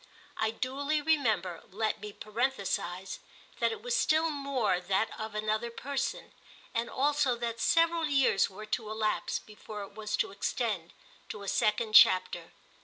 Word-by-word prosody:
I 220 Hz, -, +1 dB
duly 280 Hz, +6 st, -1 dB
remember, 220 Hz, -, +1 dB
let 215 Hz, +2 st, -2 dB
me 210 Hz, 0 st, -6 dB
parenthesise, 200 Hz, -5 st, -2 dB, 0.4 s
that -, -, +2 dB
it 445 Hz, -1 st, -7 dB
was -, -, 0 dB
still 320 Hz, -7 st, +3 dB
more 275 Hz, -9 st, 0 dB
that 190 Hz, +4 st, 0 dB
of 220 Hz, -1 st, -5 dB
another 215 Hz, +2 st, -1 dB
person, 275 Hz, +3 st, -4 dB, 0.4 s
and 230 Hz, +1 st, -1 dB
also 285 Hz, -2 st, +2 dB
that 230 Hz, -1 st, -3 dB
several 330 Hz, +3 st, +3 dB
years 270 Hz, -9 st, +3 dB
were 205 Hz, +3 st, -9 dB
to 215 Hz, 0 st, -3 dB
elapse 215 Hz, 0 st, -1 dB
before 210 Hz, -1 st, -9 dB
it 200 Hz, -, -11 dB
was 210 Hz, 0 st, -3 dB
to -, -, 0 dB
extend 200 Hz, -4 st, -2 dB, 0.4 s
to 205 Hz, -, -6 dB
a -, -, -8 dB
second 215 Hz, +2 st, +1 dB
chapter. 185 Hz, -4 st, +6 dB
220 Hz, 150 wpm, -30 LUFS, 205-275 Hz, 0.4 s, chapter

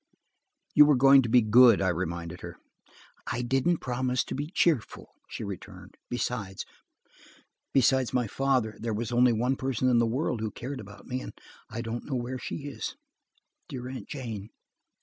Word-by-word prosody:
"You 150 Hz, 0 st, +8 dB
were 150 Hz, -, +5 dB
going 135 Hz, +1 st, +7 dB
to 120 Hz, -, -3 dB
be 120 Hz, 0 st, +5 dB
good," 115 Hz, 0 st, +7 dB
I 95 Hz, -, +2 dB
reminded 85 Hz, 0 st, -4 dB
her. -, -, -8 dB, 0.7 s
"I 125 Hz, -, -2 dB
didn't 135 Hz, +7 st, +1 dB
promise 125 Hz, 0 st, 0 dB
to -, -, -6 dB
be 145 Hz, +3 st, -4 dB
cheerful," 165 Hz, -, 0 dB, 0.2 s
she -, -, -6 dB
returned. 100 Hz, -3 st, -8 dB, 0.2 s
"Besides 115 Hz, -6 st, -3 dB, 1.5 s
my 125 Hz, -1 st, +1 dB
father, 125 Hz, -1 st, 0 dB
there 115 Hz, -1 st, -2 dB
was 115 Hz, +1 st, -3 dB
only 120 Hz, +1 st, +4 dB
one 125 Hz, +4 st, 0 dB
person 130 Hz, -1 st, 0 dB
in 120 Hz, -2 st, +4 dB
the 115 Hz, -, +3 dB
world 125 Hz, -1 st, -1 dB
who 110 Hz, -, -1 dB
cared 130 Hz, +5 st, -6 dB
about 105 Hz, -1 st, -12 dB
me, 130 Hz, 0 st, -3 dB
and -, -, -8 dB, 0.4 s
I 115 Hz, +2 st, -5 dB
don't 115 Hz, +1 st, -5 dB
know 135 Hz, -, -3 dB
where 125 Hz, +1 st, -3 dB
she 140 Hz, -, -6 dB
is. 145 Hz, -, -5 dB, 0.7 s
Dear 130 Hz, -4 st, -6 dB
Aunt 130 Hz, -, -7 dB
Jane!" 115 Hz, -7 st, -6 dB
125 Hz, 170 wpm, -28 LUFS, 110-130 Hz, 1.5 s, You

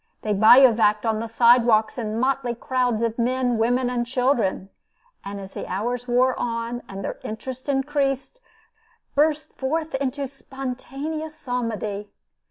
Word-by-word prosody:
They 215 Hz, -, 0 dB
bivouacked 220 Hz, -1 st, +6 dB
on 220 Hz, -1 st, +1 dB
the 230 Hz, -, -3 dB
side 235 Hz, +2 st, +5 dB
walks 220 Hz, -2 st, +2 dB
in 220 Hz, -1 st, -3 dB
motley 260 Hz, -1 st, 0 dB
crowds 245 Hz, -3 st, 0 dB
of 230 Hz, 0 st, -1 dB
men, 245 Hz, -1 st, +1 dB
women, 245 Hz, +3 st, +2 dB
and 245 Hz, -1 st, -1 dB
children; 240 Hz, -6 st, 0 dB, 0.5 s
and 200 Hz, 0 st, -6 dB
as 195 Hz, -1 st, -9 dB
the -, -, -6 dB
hours 240 Hz, +6 st, -2 dB
wore 250 Hz, +1 st, +3 dB
on, 235 Hz, 0 st, -3 dB
and 195 Hz, 0 st, -6 dB
their -, -, -5 dB
interest 255 Hz, +5 st, -6 dB
increased, 275 Hz, -, -1 dB, 0.7 s
burst 305 Hz, +1 st, +1 dB
forth 310 Hz, +4 st, -2 dB
into 275 Hz, +1 st, -2 dB
spontaneous 275 Hz, +4 st, -6 dB
psalmody. 225 Hz, -7 st, -3 dB
245 Hz, 140 wpm, -23 LUFS, 225-270 Hz, 0.7 s, bivouacked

